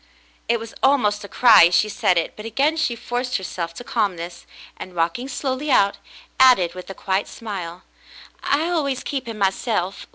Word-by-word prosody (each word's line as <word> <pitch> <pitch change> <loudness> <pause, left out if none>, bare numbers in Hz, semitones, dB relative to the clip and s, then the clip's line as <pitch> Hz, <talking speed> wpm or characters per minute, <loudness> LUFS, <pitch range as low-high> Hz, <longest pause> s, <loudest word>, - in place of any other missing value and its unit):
It 235 0 +2
was 225 0 -9
almost 210 -7 +2
a - - -8
cry, 230 -4 +7
as 175 +1 +2
she 215 - +3
said 190 -3 +1
it, 165 - -1
but 210 - -9
again 270 +8 0
she 310 -7 0
forced 245 +2 -3
herself 175 -3 -5
to 245 - -8
calmness, 180 -8 -3 0.3
and, 185 - -10
walking 170 +10 -1
slowly 270 +2 -3
out, 200 -6 +3 0.4
added, 245 -10 +5
with 185 0 -10
a 195 - -7
quiet 195 +1 -1
smile: 185 -5 -7 0.6
"I 295 +4 0
always 285 -7 -1
keep 265 -4 -4
him 225 -2 -6
myself. 195 -1 -1
220 Hz, 175 wpm, -21 LUFS, 185-255 Hz, 0.6 s, cry